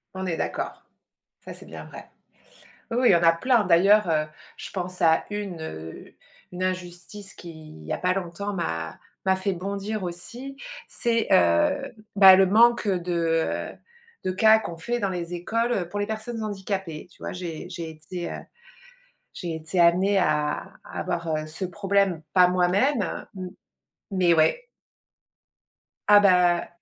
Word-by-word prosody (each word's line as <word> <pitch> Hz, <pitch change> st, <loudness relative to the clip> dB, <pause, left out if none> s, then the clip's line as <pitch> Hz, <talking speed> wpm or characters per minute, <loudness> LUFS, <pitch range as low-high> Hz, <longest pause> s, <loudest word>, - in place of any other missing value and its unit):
On 190 Hz, -, -4 dB
est 170 Hz, -3 st, -2 dB
d'accord. -, -, -4 dB, 0.6 s
Ça -, -, -8 dB
c'est -, -, -12 dB
bien -, -, -9 dB
vrai. -, -, -12 dB, 0.8 s
Oui, 230 Hz, -, -1 dB
oui, 250 Hz, -, +4 dB
il -, -, +7 dB
y 175 Hz, -, +6 dB
en 170 Hz, -, +2 dB
a 165 Hz, -, +7 dB
plein. 235 Hz, +6 st, +2 dB
D'ailleurs, 185 Hz, +3 st, +5 dB
heu, 155 Hz, -1 st, +1 dB, 0.3 s
je -, -, -8 dB
pense 185 Hz, -1 st, -5 dB
à 160 Hz, -1 st, +4 dB
une, 200 Hz, -5 st, -5 dB
heu 80 Hz, -, -8 dB, 0.4 s
une 180 Hz, +1 st, -4 dB
injustice 185 Hz, +2 st, -5 dB
qu'il 155 Hz, -, -12 dB
y 75 Hz, -, -4 dB
a -, -, -1 dB
pas 180 Hz, 0 st, +1 dB
longtemps 195 Hz, +2 st, -4 dB
m'a 80 Hz, -, -4 dB, 0.3 s
m'a 190 Hz, 0 st, +3 dB
fait 195 Hz, +1 st, -1 dB
bondir 200 Hz, +3 st, -4 dB
aussi, 235 Hz, +10 st, -6 dB, 0.3 s
c'est, 230 Hz, -1 st, +2 dB
heu 285 Hz, +7 st, +3 dB, 0.2 s
bah 190 Hz, -2 st, +9 dB
le 195 Hz, -, +6 dB
manque 230 Hz, +3 st, +4 dB
de, 180 Hz, -2 st, -1 dB, 0.6 s
heu -, -, -20 dB, 0.5 s
de 185 Hz, -, -1 dB
cas 220 Hz, +3 st, +5 dB
qu'on 170 Hz, -6 st, -7 dB
fait 240 Hz, +7 st, -2 dB
dans 200 Hz, -, -1 dB
les 175 Hz, -1 st, -4 dB
écoles, 230 Hz, +7 st, -1 dB
heu, 175 Hz, -3 st, -2 dB
pour 205 Hz, -, -4 dB
les 205 Hz, -, -1 dB
personnes 220 Hz, +1 st, -5 dB
handicapées. 190 Hz, -5 st, -4 dB
Tu -, -, -23 dB
vois, -, -, -5 dB
j'ai 175 Hz, -3 st, -6 dB
j'ai 170 Hz, -2 st, -6 dB
été, 160 Hz, +3 st, -7 dB
heu -, -, -5 dB, 1.0 s
j'ai 170 Hz, -3 st, -5 dB
été 160 Hz, +3 st, -3 dB
amenée 185 Hz, +4 st, +4 dB
à 150 Hz, -5 st, 0 dB
à -, -, -5 dB
voir, 170 Hz, -1 st, -3 dB
heu, 155 Hz, -, -4 dB
ce 160 Hz, +5 st, -3 dB
problème, 195 Hz, -2 st, 0 dB
pas 180 Hz, -1 st, +6 dB
moi-même, 185 Hz, +8 st, +2 dB
heu 170 Hz, -, -5 dB, 0.2 s
mmh, 180 Hz, -, -5 dB, 0.6 s
mais 180 Hz, -3 st, +3 dB
ouais. 165 Hz, -, +2 dB, 1.4 s
Ah 210 Hz, 0 st, +8 dB
bah 180 Hz, -3 st, +4 dB
185 Hz, 170 wpm, -25 LUFS, 170-205 Hz, 1.4 s, bah